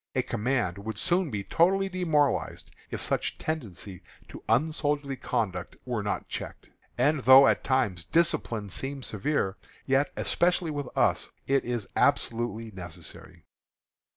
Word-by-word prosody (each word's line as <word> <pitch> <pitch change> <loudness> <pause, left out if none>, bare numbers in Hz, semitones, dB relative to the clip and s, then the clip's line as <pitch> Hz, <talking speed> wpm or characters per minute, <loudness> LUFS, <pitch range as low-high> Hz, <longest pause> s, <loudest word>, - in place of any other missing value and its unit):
A 130 - +2
command 120 -5 -1
would 110 +2 -5
soon 180 -1 +1
be 105 -5 -3
totally 190 - +3
demoralized, 160 -7 0 0.2
if - - -4
such - - -1
tendencies 105 - -5 0.3
to - - -10
unsoldierly 145 +2 +1
conduct 95 -8 -2
were 120 -4 -2
not 100 - -3
checked. - - -7 0.3
And 150 0 +3
though 130 +2 +8
at - - +2
times 110 - 0
discipline 115 - +1
seems 135 +6 -4
severe, 105 -3 -1 0.3
yet, 135 +2 +2
especially 175 -1 +1
with 145 -3 -4
us, - - +2 0.2
it 135 0 +2
is 120 -5 -2
absolutely 115 -1 +1
necessary. 90 -4 -10
130 Hz, 130 wpm, -28 LUFS, 105-150 Hz, 0.3 s, though